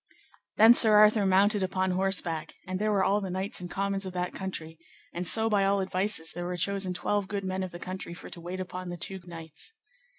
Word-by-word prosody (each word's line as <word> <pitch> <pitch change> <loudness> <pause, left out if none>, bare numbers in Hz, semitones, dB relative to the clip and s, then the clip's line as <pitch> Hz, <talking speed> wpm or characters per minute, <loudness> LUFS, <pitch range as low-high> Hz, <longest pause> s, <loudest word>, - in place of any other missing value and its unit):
Then 225 +2 +9
Sir 220 -3 +6
Arthur 210 -1 +5
mounted 200 +2 +3
upon 185 0 0
horseback, 180 -4 -1
and 185 0 -4
there 215 +1 +1
were 195 -2 +2
all 205 +2 +2
the 190 - -4
knights 190 +1 -3
and 175 - -6
commons 195 +1 -2
of 185 -1 -6
that 180 0 -3
country; 165 -4 -6 0.3
and 175 0 -3
so 225 +4 +4
by 205 -3 +2
all 200 0 +2
advices 190 -2 0
there 175 +1 -5
were 180 0 -3
chosen 190 0 0
twelve 205 +1 -1
good 200 -1 -4
men 185 0 -3
of 185 - -3
the 175 - -9
country 185 -1 -7
for - - -10
to 170 - -9
wait 180 +2 -6
upon 185 0 -6
the 175 - -5
two 190 +3 -3
knights. 165 - -9
190 Hz, 225 wpm, -28 LUFS, 180-200 Hz, 0.3 s, Then